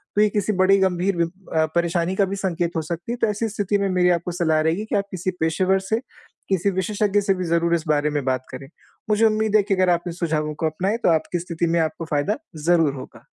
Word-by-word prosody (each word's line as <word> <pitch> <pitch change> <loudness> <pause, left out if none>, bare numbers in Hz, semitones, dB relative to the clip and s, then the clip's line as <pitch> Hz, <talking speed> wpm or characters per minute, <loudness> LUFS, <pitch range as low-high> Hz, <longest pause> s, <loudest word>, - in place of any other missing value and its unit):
तो 210 - +4
ये 215 - +4
किसी 210 +1 -1
बड़ी 190 +1 +4
गंभीर 190 0 +1
बि 170 - +3 0.3
अ, 160 0 +3
परेशानी 170 +1 0
का 200 - +3
भी 195 +1 -4
संकेत 175 -3 -1
हो - - +1
सकती 170 +7 -5
है, - - -1
तो 230 - +1
ऐसी 210 +2 -1
स्थिति 205 -1 -1
में 200 -1 0
मेरी 180 -1 +3
आपको 175 +1 -1
सलाह 160 -3 +1
रहेगी 165 +7 0
कि - - -3
आप 200 - 0
किसी 185 0 -2
पेशेवर 185 +4 +2
से, 220 +4 -1 0.5
किसी 190 0 +1
विशेषज्ञ 205 +2 0
से 195 -1 +2
भी 185 - -3
ज़रूर 170 0 +2
इस 165 -1 -3
बारे 150 0 +2
में 145 -2 -1
बात 130 -1 -1
करें। 130 +1 -8 0.4
मुझे 215 +2 +3
उम्मीद 215 -1 +1
है 210 - +3
कि 195 0 0
अगर 185 -1 +2
आप 175 0 +1
इन 175 - -4
सुझावों 155 -3 -1
को 160 - -3
अपनाएँ, 190 +8 -1
तो 235 - +1
आपकी 165 +2 -1
स्थिति 170 0 -2
में 170 - +2
आपको 160 +1 -3
फ़ायदा 145 - 0 0.3
ज़रूर 165 -5 +4
होगा। 130 - -11
180 Hz, 245 wpm, -22 LUFS, 165-200 Hz, 0.5 s, तो